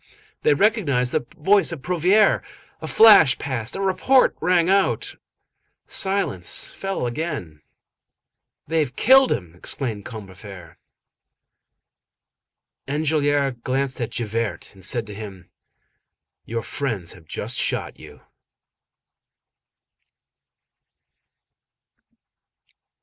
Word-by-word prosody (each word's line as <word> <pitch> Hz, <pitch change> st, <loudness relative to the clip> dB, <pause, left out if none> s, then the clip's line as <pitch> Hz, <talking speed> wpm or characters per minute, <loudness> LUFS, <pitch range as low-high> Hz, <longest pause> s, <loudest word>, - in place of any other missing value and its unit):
They 150 Hz, -, +3 dB
recognized 145 Hz, -, +1 dB
the 120 Hz, -, -2 dB
voice 195 Hz, +4 st, +3 dB
of 155 Hz, -5 st, -7 dB
Prouvaire. 180 Hz, +4 st, +3 dB, 0.4 s
A -, -, -5 dB
flash 205 Hz, -, +7 dB
passed, 125 Hz, -4 st, -4 dB
a 195 Hz, -, -4 dB
report 225 Hz, +7 st, +3 dB
rang 175 Hz, 0 st, +2 dB
out. 195 Hz, +1 st, +1 dB, 0.7 s
Silence 190 Hz, -, -2 dB
fell 195 Hz, -8 st, -4 dB
again. 120 Hz, -, -5 dB, 1.0 s
"They 160 Hz, +2 st, 0 dB
have 130 Hz, -5 st, -2 dB
killed 265 Hz, +2 st, +5 dB
him," 90 Hz, -6 st, -3 dB
exclaimed 105 Hz, +4 st, -2 dB
Combeferre. 95 Hz, -5 st, -11 dB, 2.1 s
Enjolras 145 Hz, -3 st, 0 dB
glanced 135 Hz, 0 st, -2 dB
at 115 Hz, -, -2 dB
Javert, 115 Hz, -2 st, -4 dB
and 95 Hz, -1 st, -17 dB
said 115 Hz, +4 st, -2 dB
to 105 Hz, -, -9 dB
him:— 100 Hz, -4 st, -10 dB, 0.9 s
"Your 115 Hz, 0 st, -4 dB
friends 105 Hz, -13 st, -4 dB
have 85 Hz, -3 st, -17 dB
just -, -, -4 dB
shot -, -, -2 dB
you." -, -, -14 dB
135 Hz, 95 wpm, -22 LUFS, 105-175 Hz, 2.1 s, flash